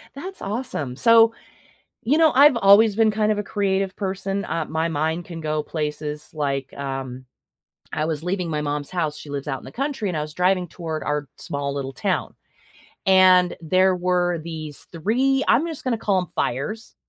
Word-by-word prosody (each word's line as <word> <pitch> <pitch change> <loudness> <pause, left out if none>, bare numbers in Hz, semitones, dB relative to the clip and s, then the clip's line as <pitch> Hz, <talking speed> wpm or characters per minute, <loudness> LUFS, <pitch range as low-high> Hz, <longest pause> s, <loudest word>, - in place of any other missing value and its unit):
That's 375 +7 -8
awesome. 200 - -4
So, 230 - +5 0.7
you 280 +8 +2
know, 320 -1 +6
I've 280 0 +6
always 205 +1 +6
been 220 -1 +4
kind 215 0 +1
of 210 - -2
a - - 0
creative 195 -1 -1
person, 195 0 -3
uh, 165 -2 -2
my 160 +1 -1
mind 160 +2 -1
can 170 -2 -8
go 155 -1 -1
places 150 -1 -4
like, 140 -3 -2
um, 135 -2 -5 0.7
I 155 - -1
was 155 -1 -2
leaving 180 0 -2
my 150 -2 -1
mom's 145 -1 -3
house- 160 -5 -1
she 145 - -10
lives 140 0 -4
out 135 -2 -2
in - - -15
the - - -10
country- 270 -5 -2
and 175 - -2
I - - -1
was 150 0 -6
driving 180 +1 +1
toward 160 -2 -5
our 150 -1 -2
small 140 -1 -4
little 135 -1 -4
town. - - -2 0.7
And 185 -1 +5
there 185 +3 +3
were 180 -1 +1
these 155 -3 -7
3- 255 - +1
I'm 300 +7 +4
just 320 -4 -6
gonna 250 -3 0
call 200 -3 +1
'em 180 - -5
fires 215 - -3
180 Hz, 185 wpm, -23 LUFS, 150-210 Hz, 0.7 s, know